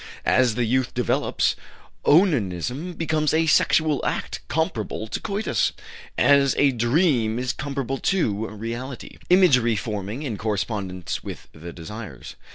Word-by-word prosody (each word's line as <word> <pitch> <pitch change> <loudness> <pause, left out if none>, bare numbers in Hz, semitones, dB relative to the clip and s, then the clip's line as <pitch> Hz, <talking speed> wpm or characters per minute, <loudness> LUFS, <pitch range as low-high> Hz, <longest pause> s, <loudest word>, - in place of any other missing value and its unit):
"As 125 -4 +3
the 120 -1 +1
youth 130 +2 0
develops, - - +1 0.5
onanism 145 - +2
becomes 155 -2 +1
a 165 +1 +3
sexual 155 -2 +3
act - - -2
comparable 110 - -2
to 110 - -4
coitus 210 +1 -1 0.4
as 140 -1 +4
a 140 -1 +4
dream 120 -2 +2
is 125 0 -1
comparable 135 -2 -3
to 110 - 0
reality, 115 +5 -7
imagery 130 - +5
forming 105 +5 -4
in 115 -8 -4
correspondence 100 -4 -3
with - - -8
the 85 +2 -9
desires. 85 - -9
125 Hz, 125 wpm, -24 LUFS, 110-150 Hz, 0.5 s, imagery